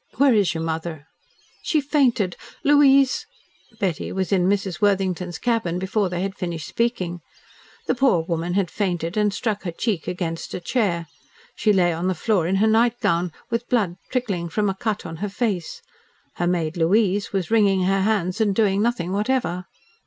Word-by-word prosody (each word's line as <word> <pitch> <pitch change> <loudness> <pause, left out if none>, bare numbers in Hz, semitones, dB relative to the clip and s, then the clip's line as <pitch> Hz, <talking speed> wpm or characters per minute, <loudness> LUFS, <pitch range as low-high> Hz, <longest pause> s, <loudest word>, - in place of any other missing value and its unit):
"Where 275 0 +5
is 200 -6 +2
your 160 - -2
mother?" 160 -2 -4 0.6
"She 315 - +1
fainted 265 - +1 0.3
Louise 275 -2 +4 0.3
" 225 -2 -30
Betty 180 -6 -2
was 190 0 -2
in 185 -2 +3
Mrs. 195 -1 -1
Worthington's 185 -3 +1
cabin 225 -8 0
before 195 +1 0
they 175 0 -3
had 195 0 -2
finished 170 -5 -5
speaking. 185 -8 -1 0.6
The - - +1
poor 240 -10 +3
woman 170 +1 -2
had 195 -4 0
fainted, 175 -4 -2
and 210 -1 +2
struck 210 0 -2
her 175 - -4
cheek 190 0 -2
against 170 -2 -4
a - - -3
chair. 175 -4 0 0.5
She 215 - +2
lay 180 -4 +3
on 170 +3 -2
the 185 - 0
floor 180 -1 +1
in 190 - +1
her 210 +3 +3
nightgown, 220 -7 +2 0.2
with 230 +1 -2
blood 205 -8 +1
trickling 200 -10 -2
from 205 +3 0
a - - -6
cut 210 +1 -3
on 165 - -6
her 205 +4 -3
face. 200 -5 -3 0.5
Her 175 - 0
maid, 170 -2 -1
Louise, 200 +4 +2
was 195 0 -2
wringing 200 -4 +3
her 195 +1 +2
hands, 195 -1 0
and 205 -3 +2
doing 200 -2 +2
nothing 210 -6 0
whatever. 205 -3 -1
195 Hz, 175 wpm, -23 LUFS, 175-220 Hz, 0.6 s, Where